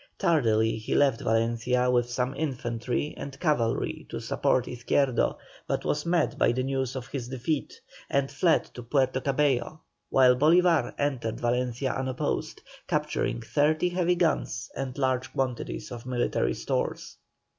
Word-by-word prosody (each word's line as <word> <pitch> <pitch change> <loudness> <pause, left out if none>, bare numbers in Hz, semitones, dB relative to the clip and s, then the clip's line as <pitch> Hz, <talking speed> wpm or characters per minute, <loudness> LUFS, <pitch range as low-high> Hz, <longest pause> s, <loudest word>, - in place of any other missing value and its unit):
Tardily, 115 -8 +2
he 110 - -2
left 135 -5 +3
Valencia 115 +2 +1
with 120 -1 +2
some 125 +1 -1
infantry 125 -2 -2
and 140 -1 -7
cavalry 135 -9 0
to - - -4
support 125 - +1
Izquierdo, 125 +1 +1 0.3
but - - -2
was 150 +2 -1
met 175 0 +1
by - - +4
the 130 +1 -1
news 135 -1 -2
of 130 -2 -4
his 130 -3 -5
defeat, 130 +4 -3 0.3
and 140 -1 +1
fled 170 -3 +2
to 125 - -7
Puerto 130 +1 +1
Cabello, 140 +1 0 0.3
while 130 -1 +5
Bolívar 160 -1 +4
entered 130 -6 -1
Valencia 125 +2 0
unopposed, 130 -1 -2 0.3
capturing 115 - -1
thirty 155 +7 +2
heavy 180 0 +1
guns 170 -2 0
and 135 -1 -4
large 130 -1 0
quantities 120 - -3
of 120 0 -8
military 120 - 0
stores. - - -3
130 Hz, 140 wpm, -27 LUFS, 120-145 Hz, 0.3 s, while